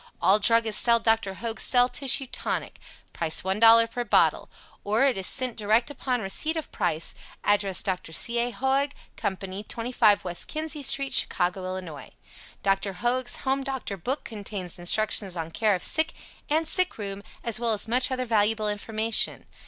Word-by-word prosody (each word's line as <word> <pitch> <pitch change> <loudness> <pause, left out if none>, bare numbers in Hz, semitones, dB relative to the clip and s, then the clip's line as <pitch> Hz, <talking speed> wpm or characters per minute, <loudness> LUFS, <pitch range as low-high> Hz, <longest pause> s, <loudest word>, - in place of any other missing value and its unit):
All 200 +2 +4
druggists 225 0 +3
sell 235 -1 +4
Dr. 225 -4 +1
Hoag's 230 +2 -3
Cell 245 -1 +4
Tissue 270 +1 0
Tonic. - - -4 0.3
Price 160 -2 -1
$1.00 225 +4 +5
per 245 +1 -3
bottle. - - +2 0.3
Or 215 +5 +1
it 275 -3 +3
is 190 -1 0
sent 255 -3 +1
direct 220 +5 +1
upon 255 -3 -3
receipt 310 +12 +1
of 320 - -6
price. 160 +2 -1 0.3
Address 200 -2 +1
Dr. 185 -4 -3
C. 235 +8 +2
A. 240 +1 0
Hoag 270 +3 -1 0.2
Company, 190 0 -4
25 230 -2 +1
West 175 -2 -6
Kinzie 310 -1 -3
St., 275 0 0
Chicago, 185 +1 +1
Ills. 165 -6 -9 0.5
Dr. 195 0 0
Hoag's 245 +4 -2
"Home 270 +1 0
Doctor 265 -6 -5
Book" 250 - -4
contains 200 -5 -5
instructions 195 0 +1
on 165 0 -5
care 210 +3 +1
of 180 - -5
sick 315 +1 +2 0.4
and 315 +2 +1
sick 365 +2 +1
room 200 -2 -6 0.2
as 230 -3 0
well 235 -1 0
as 210 - 0
much 250 +3 +4
other 255 -1 -2
valuable 215 -1 +1
information. 220 +2 0
225 Hz, 165 wpm, -25 LUFS, 195-255 Hz, 0.5 s, $1.00